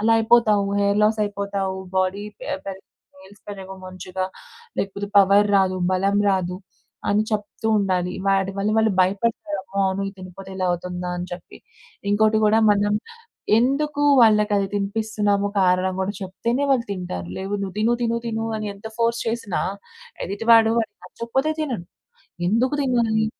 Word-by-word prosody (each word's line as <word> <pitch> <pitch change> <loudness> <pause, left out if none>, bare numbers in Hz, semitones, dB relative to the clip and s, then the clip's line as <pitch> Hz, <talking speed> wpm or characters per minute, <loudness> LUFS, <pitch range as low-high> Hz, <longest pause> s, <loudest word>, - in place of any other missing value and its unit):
అలా 225 +2 +3
అయిపోతావు. 220 -3 +4 0.2
Hair 200 0 +2
loss 215 +1 +3
అయిపోతావు. 200 -1 -3 0.2
బోడీ 190 +2 0
పె - - -9 0.2
పెరగదు. 190 -1 -7 0.4
నేయిల్స్ 195 +2 -17
పెరగవు 190 -1 -8
మంచిగా. 185 0 -5 0.5
లేకపోతే, 200 +1 -3
పవర్ 200 +1 +5
రాదు. 190 -1 +2 0.2
బలం 195 +2 +2
రాదు. 180 -2 -1 0.5
అని 205 +1 +3
చెప్తూ 210 +1 -3
ఉండాలి. 180 -2 0 0.2
వాటి 195 0 +2
వల్ల, 200 +2 +1
వాళ్ళు 220 -1 +3
భయపడతారు. 200 +2 0
అమ్మో! 195 +1 -3
అవును. 190 +1 -2
ఇది - - -20
తినపోతే, 185 +1 -10
ఇలా 185 -1 0
అవుతుందా 180 0 -4
అని 175 - -4
చెప్పి. 175 -1 -9 0.5
ఇంకోటి 215 +1 +3
కూడా, 220 +1 +4
మనం 205 0 +1 0.6
ఎందుకు 285 +4 +1 0.2
వాళ్ళకది 210 -3 +4
తినిపిస్తున్నాము, 205 0 0
కారణం 185 0 +2
కూడా 190 +2 -1
చెప్తేనే, 230 +8 -2
వాళ్ళు 255 -3 +3
తింటారు. 175 - -5
లేవు, 195 +2 -3
నువ్వు 190 -1 -5
తిను, 220 +2 +2
తిను, 230 0 +1
తిను 225 -1 -2
అని 215 0 -4
ఎంత 200 +2 -11
ఫోర్స్ 235 0 +1
చేసినా, 225 -5 -2 0.6
ఎదిటివాడు, 225 +2 +4
వాడికి 220 -2 -2
నచ్చకపోతే 265 +6 -2
తినడు. 245 - -3 0.6
ఎందుకు 245 +8 +2
తినాలి? 235 -5 +1
205 Hz, 145 wpm, -22 LUFS, 190-220 Hz, 0.6 s, పవర్